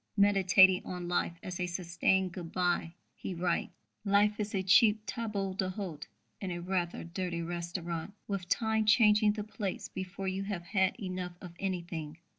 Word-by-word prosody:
_ - - -49
Meditating 190 -2 +6
on 180 -1 -5
life 175 -1 0
as 180 -1 -5
"a 180 - 0
sustained 180 +1 +1
good 175 -2 -7
bye," 175 -2 0 0.2
he 185 - -6
writes: 170 0 -1 0.3
Life 205 +1 +3
is 210 0 -2
a 190 - 0
cheap 210 +2 +5
table 210 -5 -3
d'hôte 185 -5 -4 0.3
in 195 - -4
a 175 - -3
rather 175 -1 -2
dirty 170 0 -3
restaurant, 170 +2 -4
with 195 -3 -3
Time 220 -1 +1
changing 210 -1 +5
the 210 -1 -4
plates 205 -2 -4
before 190 +1 -5
you 190 +1 -1
have 195 -4 -4
had 190 +3 +1
enough 185 -3 -4
of 175 -2 -10
anything. 170 -5 -4
185 Hz, 165 wpm, -31 LUFS, 175-200 Hz, 0.3 s, Meditating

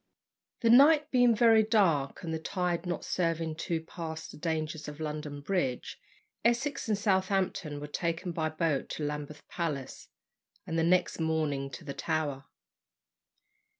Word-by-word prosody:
The 230 -2 +4
night 290 +4 +6
being 245 -2 +5
very 225 -1 +6
dark, 190 - +2
and 165 -1 -3
the 160 - -2
tide 175 0 -2
not 175 -2 -3
serving 165 -2 -1
to 165 -1 -2
pass 160 -1 -6
the - - -11
dangers 155 -1 -3
of 150 0 -8
London 150 -2 -4
Bridge, 140 -7 -2 0.4
Essex 240 +2 +1
and 210 - +2
Southampton 190 -6 0
were 145 - -5
taken 170 +4 -2
by 160 -2 -1
boat 155 -3 -1
to 155 - -4
Lambeth 150 0 -5
Palace, 150 -6 -4 0.6
and 165 - -4
the - - +2
next 180 +1 +2
morning 155 -4 0
to 130 - -9
the 140 - -4
Tower. 145 -4 -2
165 Hz, 150 wpm, -30 LUFS, 150-190 Hz, 0.6 s, night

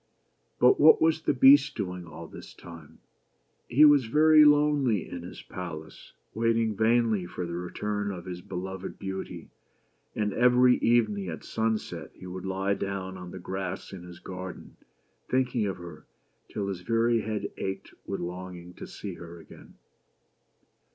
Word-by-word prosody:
But 125 - +5
what 155 +2 +7
was 160 0 +2
the - - +1
Beast 135 +2 +6
doing 90 -4 -5
all 80 - -9
this - - -12
time? 80 -3 -13 0.7
He 145 +6 +6
was 145 -4 +6
very 155 +4 +6
lonely 145 - +3
in 90 - -7
his 90 - -10
palace, 80 -3 -9 0.2
waiting 115 0 +1
vainly 110 -3 +2
for 90 - -5
the 85 - -6
return 100 +4 -3
of 90 -3 -8
his 90 -1 -6
beloved 95 +1 -6
Beauty; 95 -1 -6 0.6
and 105 -1 -1
every 125 +1 +5
evening, 110 -5 +2
at 80 - -7
sunset, 110 -1 -2
he - - -12
would 90 +1 -6
lie 95 +1 0
down 100 -1 -4
on 90 -1 -9
the 95 - -8
grass 95 +1 -5
in 95 - -8
his 90 -1 -11
garden, 90 0 -9 0.5
thinking 125 -4 +1
of 95 - -3
her 85 -3 -11 0.4
till 100 -2 -3
his 95 -2 -5
very 115 +2 +2
head 105 -2 -3
ached 95 0 -5
with 100 - -3
longing 90 0 -7
to - - -9
see 100 -3 -7
her 85 0 -10
again. 80 - -15
100 Hz, 155 wpm, -28 LUFS, 90-115 Hz, 0.7 s, what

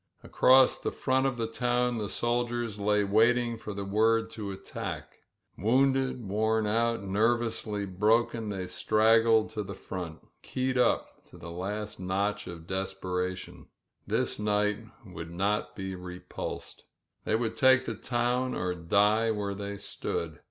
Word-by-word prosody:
Across 130 0 +5
the - - -2
front 130 +1 +1
of 130 -2 -2
the 115 - -1
t< 115 0 -9
the 120 -3 +1
soldiers 120 -2 -1
lay 105 0 +2
waiting 115 +4 +3
for 110 -1 -7
the 100 -1 -4
word 115 +3 +2
to 110 -2 -6
atti 95 -1 -5 0.6
Wounded, 130 +1 +2
worn 110 +2 +1
out, 115 +1 +1
nervously 110 0 0
broken, 110 +3 +1
they 95 -2 -3
stragj 110 +3 +3
to 105 - -3
the 100 -1 -6
front, 90 -4 -7
keyed 130 0 -2
up 125 - +1
to - - -16
the 85 0 -9
last 105 +4 -4
notch 100 +3 -1
of 85 -2 -8
desperat 95 -1 -3 0.6
This - - 0
night 105 0 +1 0.3
they 95 - -12
would 85 -2 -7
not 95 +1 -1
be 95 -1 -4
repulsed. 90 0 -7 0.4
They - - -1
wc 110 0 0
take 130 0 +5
the 115 - -2
town 120 +3 -1
or 90 0 -1
die 105 +6 +2
where 105 -2 -1
they 100 0 -5
stood. 80 -5 -4
105 Hz, 145 wpm, -29 LUFS, 95-115 Hz, 0.6 s, Across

